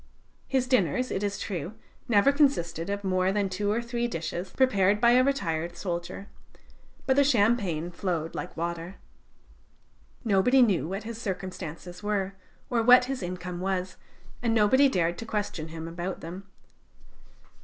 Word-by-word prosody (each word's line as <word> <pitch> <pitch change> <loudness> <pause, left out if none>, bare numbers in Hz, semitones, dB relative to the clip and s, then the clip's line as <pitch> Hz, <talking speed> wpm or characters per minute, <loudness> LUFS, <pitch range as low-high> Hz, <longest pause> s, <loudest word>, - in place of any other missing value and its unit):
His 265 -1 +1
dinners, 255 - +1
it 190 - -1
is 200 -1 -1
true, 180 +1 -5 0.3
never 230 +3 +5
consisted 200 - +1
of 200 0 -3
more 185 -1 +1
than 200 -1 0
two 205 +2 -1
or 230 +3 0
three 235 0 -2
dishes, 170 -1 -4
prepared 205 -6 +3
by 235 +1 +5
a 250 +1 +5
retired 175 -11 -1
soldier, 175 +2 -4 0.8
but 265 - +3
the 280 - +5
champagne 205 - +2
flowed 170 -3 -3
like 180 - -6
water. 170 +2 -4 1.3
Nobody 230 +5 +5
knew 180 - +1
what 195 +4 -4
his 230 0 -7
circumstances 180 -3 -6
were, 200 -2 -1 0.3
or 240 -2 +1
what 250 +2 +7
his 265 -1 -4
income 180 0 -5
was, 185 0 -2 0.4
and 230 -2 +1
nobody 260 +6 +5
dared 175 -6 0
to 230 - -5
question 205 -7 -3
him 165 0 -7
about 175 +2 -5
them. 180 +4 -8
195 Hz, 150 wpm, -27 LUFS, 175-235 Hz, 1.3 s, what